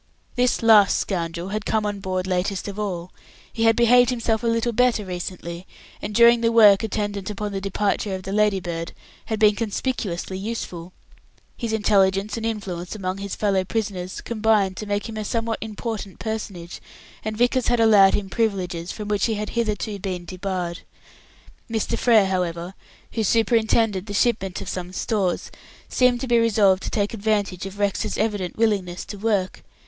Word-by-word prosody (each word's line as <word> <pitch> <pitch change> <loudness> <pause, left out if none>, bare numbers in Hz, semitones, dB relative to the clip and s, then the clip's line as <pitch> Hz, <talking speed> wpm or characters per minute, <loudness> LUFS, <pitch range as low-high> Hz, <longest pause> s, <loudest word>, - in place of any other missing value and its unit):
This 250 -1 +1
last 215 -3 +6
scoundrel 170 -1 -3
had 210 +1 -3
come 215 0 0
on 205 -1 -2
board 185 -1 -2
latest 185 +2 -1
of 200 +1 -6
all. 185 -4 -4 0.4
He 225 -1 0
had 225 0 +5
behaved 245 0 +5
himself 230 -3 0
a 235 - -1
little 230 +1 +1
better 235 -2 +2
recently, 180 -1 -6 0.3
and 205 0 -5
during 235 +1 +6
the 230 0 +2
work 210 -4 +7
attendant 205 -3 -3
upon 210 0 -4
the 195 -1 -3
departure 200 0 -1
of 185 - -7
the 195 - -5
Ladybird, 190 -5 0 0.3
had 220 - -2
been 210 -1 +6
conspicuously 205 -5 -3
useful. 185 -5 -5 0.6
His 230 -2 -4
intelligence 200 -1 +2
and 225 -1 -2
influence 190 -5 -4
among 190 -2 -3
his 200 0 -4
fellow 195 -3 +1
prisoners 190 -3 -3
combined 215 -4 +1
to 215 - -5
make 205 +2 -1
him 225 -1 -7
a 215 - -2
somewhat 225 +1 -2
important 220 -2 -5
personage, 205 -6 -5 0.4
and 215 0 -4
Vickers 245 +1 +2
had 240 -1 +2
allowed 210 -4 +6
him 205 -2 -2
privileges 185 -5 -2
from 210 -2 -6
which 205 0 +1
he 225 - -1
had 210 0 -4
been - - -9
hitherto 215 -3 -2
debarred. 180 -1 -4 0.9
Mr. 225 0 -1
Frere, 230 -4 +4
however, 180 -1 -2 0.4
who 225 - -1
superintended 225 -2 +2
the 205 - -4
shipment 195 -5 0
of - - -7
some 180 -1 -5
stores, 190 -3 -1 0.4
seemed 250 -1 +3
to 265 - -3
be 240 -1 +4
resolved 205 -4 +3
to - - -4
take 205 0 -1
advantage 205 -4 -1
of 195 +1 -10
Rex's 205 -1 -1
evident 205 -5 -2
willingness 195 -5 0
to 205 - -8
work. 200 -3 -1
205 Hz, 170 wpm, -23 LUFS, 190-225 Hz, 0.9 s, work